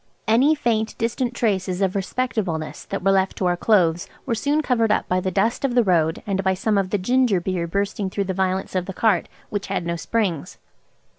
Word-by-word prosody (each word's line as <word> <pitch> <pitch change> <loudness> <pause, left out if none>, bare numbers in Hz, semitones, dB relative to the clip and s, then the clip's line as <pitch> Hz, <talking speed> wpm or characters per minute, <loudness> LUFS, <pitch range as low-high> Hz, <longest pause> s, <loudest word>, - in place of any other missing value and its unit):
Any 260 +8 +4
faint 225 -6 -1
distant 235 +1 -1
traces 190 -6 0
of 190 -2 +1
respectableness 195 -6 -2
that - - -4
were 195 - +4
left 190 0 +1
to 185 - -1
our 175 0 +2
clothes 175 -4 +2 0.2
were 255 - -1
soon 290 +7 0
covered 230 -5 +2
up - - +1
by 185 - +1
the 185 - -1
dust 205 +8 0
of 260 -3 0
the 245 - +5
road 165 -4 +1
and 195 -1 -1
by 190 0 +2
some 210 +3 0
of 190 -1 -1
the 205 - +1
ginger 245 0 +2
beer 175 -1 -2
bursting 200 +2 -2
through 200 +1 -1
the 190 -1 -3
violence 190 0 -1
of 185 -1 -1
the 195 - -5
cart, 205 -3 +1 0.2
which 205 -1 -3
had 170 - -2
no 170 0 -1
springs. 180 -4 -2
195 Hz, 215 wpm, -22 LUFS, 185-230 Hz, 0.2 s, the